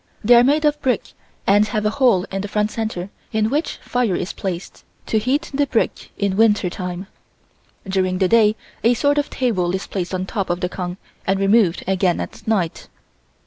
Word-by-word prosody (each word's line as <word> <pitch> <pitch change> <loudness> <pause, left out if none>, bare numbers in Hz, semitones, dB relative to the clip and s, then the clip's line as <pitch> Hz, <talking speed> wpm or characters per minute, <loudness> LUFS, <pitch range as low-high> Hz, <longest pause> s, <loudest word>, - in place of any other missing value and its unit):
They 235 +4 +6
are 240 0 +8
made 295 +4 +3
of 295 0 +1
brick 250 -5 -1 0.3
and 205 +2 +4
have 210 0 -2
a 210 - +2
hole 235 -7 +3
in 195 0 -2
the 205 - -4
front 210 +1 0
center 205 -4 -4 0.2
in 220 0 +1
which 300 +3 -1
fire 245 -7 0
is 175 - -3
placed 185 -2 -5 0.2
to 220 - +1
heat 270 +8 -1
the 285 +1 +1
brick 235 - -1
in 200 -2 0
winter 210 -5 +3
time. 180 0 -5 0.8
During 185 -1 0
the 190 0 +2
day 215 0 +4 0.3
a 235 +2 +4
sort 290 +4 +2
of 290 - -2
table 185 -8 0
is 190 - -4
placed 185 -1 -3
on 185 0 -2
top 195 -1 -3
of 175 0 -1
the 180 - 0
kong 180 -1 -5 0.3
and 195 0 +2
removed 195 -3 +3
again 185 -2 +1
at - - -7
night. 190 -7 -1
205 Hz, 195 wpm, -21 LUFS, 185-235 Hz, 0.8 s, are